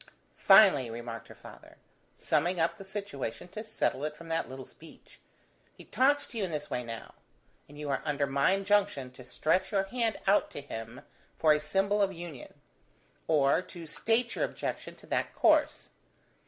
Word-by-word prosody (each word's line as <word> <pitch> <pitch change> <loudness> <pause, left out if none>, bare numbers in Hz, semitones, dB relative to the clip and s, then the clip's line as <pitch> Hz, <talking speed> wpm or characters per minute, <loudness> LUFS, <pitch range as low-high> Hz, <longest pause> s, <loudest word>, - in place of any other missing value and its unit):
"Finally," 195 - +6
remarked 115 0 -7
her - - -13
father, - - -14 0.4
summing 170 +4 0
up 165 +1 +1
the 195 - -10
situation 190 - -5
to 215 +4 -7
settle 220 -9 -1
it 150 0 -3
from 165 +1 -11
that 165 0 -1
little 130 0 -8
speech, 160 - -16 0.6
"he - - -13
talks 285 +2 +2
to 230 - -6
you - - 0
in 190 - -1
this 150 -2 -4
way 125 - -2
now; 115 -1 -8 0.6
and 145 - -13
you 150 0 -6
are 140 -1 -1
under 145 -2 0
my 140 +6 +2
injunction 195 -10 +1
to 125 0 -13
stretch 160 - 0
your 195 -2 +2
hand 225 +2 -1
out 200 +2 +3
to - - -7
him 115 -1 -8 0.4
for 155 -1 +5
a 150 - +1
symbol 195 +7 +1
of 195 -1 +2
union, 170 -7 -9 0.7
or 150 +1 +3
to 175 -2 -10
state 230 +9 0
your - - -1
objection - - -4
to - - -14
that - - -2
course. - - +2
165 Hz, 180 wpm, -30 LUFS, 140-195 Hz, 0.7 s, Finally